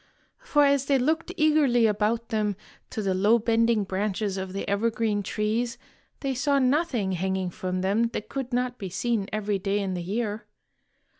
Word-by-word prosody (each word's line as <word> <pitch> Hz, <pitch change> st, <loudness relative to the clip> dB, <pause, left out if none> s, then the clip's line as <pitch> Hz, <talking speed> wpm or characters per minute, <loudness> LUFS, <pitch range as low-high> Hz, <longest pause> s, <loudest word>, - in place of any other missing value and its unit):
For 305 Hz, -13 st, +3 dB
as 280 Hz, -1 st, +2 dB
they 275 Hz, -, +4 dB
looked 315 Hz, +7 st, 0 dB
eagerly 300 Hz, -7 st, +4 dB
about 220 Hz, +2 st, 0 dB
them 210 Hz, -3 st, 0 dB, 0.3 s
to 215 Hz, -, -4 dB
the 195 Hz, -1 st, +1 dB
low 205 Hz, +5 st, +4 dB
bending 230 Hz, -1 st, +2 dB
branches 200 Hz, +1 st, -2 dB
of 190 Hz, -1 st, -4 dB
the 195 Hz, -, -4 dB
evergreen 215 Hz, 0 st, 0 dB
trees, 220 Hz, +4 st, -1 dB, 0.4 s
they 275 Hz, -1 st, -1 dB
saw 280 Hz, +3 st, +1 dB
nothing 260 Hz, -, +1 dB
hanging 190 Hz, 0 st, -1 dB
from 185 Hz, +1 st, -3 dB
them 200 Hz, +5 st, +2 dB
that 230 Hz, -2 st, -5 dB
could 265 Hz, -2 st, -4 dB
not 250 Hz, 0 st, -1 dB
be 195 Hz, -, -5 dB
seen 200 Hz, +3 st, -1 dB
every 210 Hz, -2 st, -1 dB
day 195 Hz, +1 st, 0 dB
in 195 Hz, -2 st, -1 dB
the 180 Hz, -, -3 dB
year. 210 Hz, +4 st, -3 dB
220 Hz, 170 wpm, -26 LUFS, 195-250 Hz, 0.4 s, they